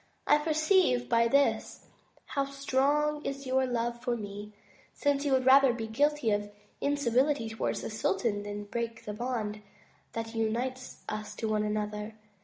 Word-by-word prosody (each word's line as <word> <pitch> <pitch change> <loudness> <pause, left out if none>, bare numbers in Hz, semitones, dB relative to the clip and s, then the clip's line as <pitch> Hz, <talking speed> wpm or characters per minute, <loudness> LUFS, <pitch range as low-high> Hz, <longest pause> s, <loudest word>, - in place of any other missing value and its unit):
I 295 - +5
perceive 310 -4 +2
by 230 -1 +3
this 280 +4 +1 0.4
how 275 -2 -1
strong 280 +2 +1
is 275 0 -4
your 260 0 +2
love 240 -1 -2
for 245 -2 0
me, 205 0 -7 0.4
since 285 0 +1
you 285 - +1
would 260 -1 +2
rather 265 -1 +7
be 230 -2 -4
guilty 285 +1 +1
of 205 0 0 0.3
incivility 280 -2 +1
towards 220 - -2
the - - -4
sultan 205 0 0
than 205 0 -5
break 230 +2 -4
the 210 - -4
bond 215 -2 -3 0.5
that 225 0 -4
unites 240 +3 -2
us 215 0 -5
to 225 - -3
one 215 -1 +1
another. 210 0 -3
240 Hz, 155 wpm, -30 LUFS, 215-275 Hz, 0.5 s, rather